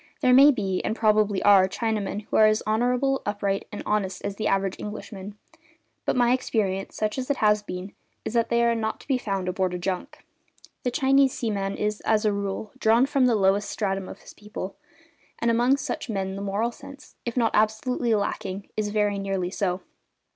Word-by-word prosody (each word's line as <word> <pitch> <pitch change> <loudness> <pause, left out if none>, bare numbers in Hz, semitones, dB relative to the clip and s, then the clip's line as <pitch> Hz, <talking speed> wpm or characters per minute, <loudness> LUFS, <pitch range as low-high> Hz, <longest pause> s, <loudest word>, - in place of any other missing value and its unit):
There 250 - +4
may 275 +3 +9
be, 195 -9 0
and 220 - -1
probably 215 -3 +2
are, 195 -2 +6
Chinamen 210 -1 -2
who - - -5
are 215 - +7
as 215 0 +1
honourable, 250 +5 +1
upright, 200 -1 -2
and 205 - -6
honest 200 -3 -1
as 200 -1 -3
the 215 - -2
average 195 -1 0
Englishman, 210 -1 -7 0.7
but - - +1
my 245 -1 +4
experience, 200 -6 -1
such 215 +4 -1
as 255 - -5
it 285 - +1
has 210 -1 +3
been, 185 -1 -7 0.3
is - - -3
that 230 -1 +1
they 235 0 +2
are 235 0 +3
not 220 -1 -2
to - - -18
be 265 -3 +1
found 195 -5 -3
aboard 185 0 -1
a - - -2
junk. 180 +1 -4 0.6
The 250 - 0
Chinese 270 +1 +3
seaman 200 -4 -2
is, 210 0 -2
as 220 -1 +1
a 210 - +3
rule, 200 +1 -4
drawn 230 +3 +4
from 275 -2 +2
the 240 - +3
lowest 200 0 +2
stratum 195 -3 -2
of - - -10
his - - -13
people, 210 -2 -7 0.6
and 235 - +1
among 245 +4 +3
such 280 - -4
men 190 -2 -2
the 195 - -5
moral 200 +4 -1
sense, 280 +4 -13
if 235 +1 -4
not 230 -2 +3
absolutely 220 +2 +1
lacking, 200 -1 -3
is 215 -1 -1
very 205 -1 0
nearly 195 -2 -2
so. 190 -2 -1
210 Hz, 200 wpm, -25 LUFS, 195-235 Hz, 0.7 s, may